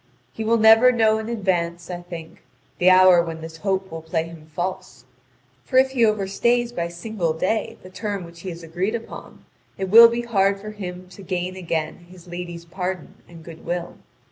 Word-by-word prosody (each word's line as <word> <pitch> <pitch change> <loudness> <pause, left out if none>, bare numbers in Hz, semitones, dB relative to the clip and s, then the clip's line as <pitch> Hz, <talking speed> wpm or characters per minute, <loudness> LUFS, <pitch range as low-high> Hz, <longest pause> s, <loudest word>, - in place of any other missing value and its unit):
He 220 - -5
will 230 +1 +2
never 225 +3 +7
know 220 -2 +2
in 220 +1 -6
advance, 175 -5 -2
I 175 0 -5
think, 170 -2 -10 0.4
the 180 - +5
hour 185 -1 +7
when 165 -1 -6
this 160 0 -9
hope 190 +1 -2
will 165 0 -6
play 160 0 -2
him 165 -2 -12
false, 175 -8 -5 0.6
for 255 - -1
if 265 0 +5
he 250 -3 +1
overstays 220 +3 +1
by 170 -8 -3
single 175 -1 -3
day 185 +7 -2
the 185 - -11
term 200 -1 -4
which 170 0 -13
he 185 - -6
has 170 -1 -8
agreed 180 +7 -2
upon, 230 -1 -9 0.3
it 190 -1 -3
will 230 +2 +11
be 235 +1 -2
hard 200 -4 +1
for 215 +1 -8
him 185 -3 -8
to 185 +2 -13
gain 185 0 -3
again 170 -1 -4
his 180 -1 -15
lady's 175 -1 -7
pardon 180 0 -5 0.2
and 165 -2 -13
goodwill. 170 +1 -6
185 Hz, 190 wpm, -22 LUFS, 170-215 Hz, 0.6 s, will